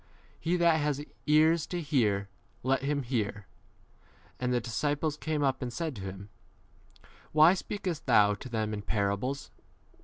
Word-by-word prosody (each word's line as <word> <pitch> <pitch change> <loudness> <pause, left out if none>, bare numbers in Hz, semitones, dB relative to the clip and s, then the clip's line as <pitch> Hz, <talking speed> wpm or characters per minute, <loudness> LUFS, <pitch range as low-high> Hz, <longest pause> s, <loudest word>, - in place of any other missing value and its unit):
He 170 +3 0
that 170 -2 +4
has 145 -1 -1 0.2
ears 155 +2 +4
10 175 - -3
to - - -4
hear, 105 -9 +1 0.4
let 135 +2 +2
him 140 0 -1
hear. 105 -4 -2 0.9
And 125 0 -1
the 125 - +2
disciples 145 +6 -1
came 150 -1 -2
up 135 -1 +1
and 125 -2 -3
said 160 +2 -3
to - - -7
him, 95 +1 -7 1.0
Why 155 +3 +7
speakest 185 -5 -4
thou 105 -4 +5
to 105 +5 -8
them 110 -2 -1
in 105 - -3
11 - - -6
parables 105 +6 -1
135 Hz, 160 wpm, -30 LUFS, 110-155 Hz, 1.0 s, Why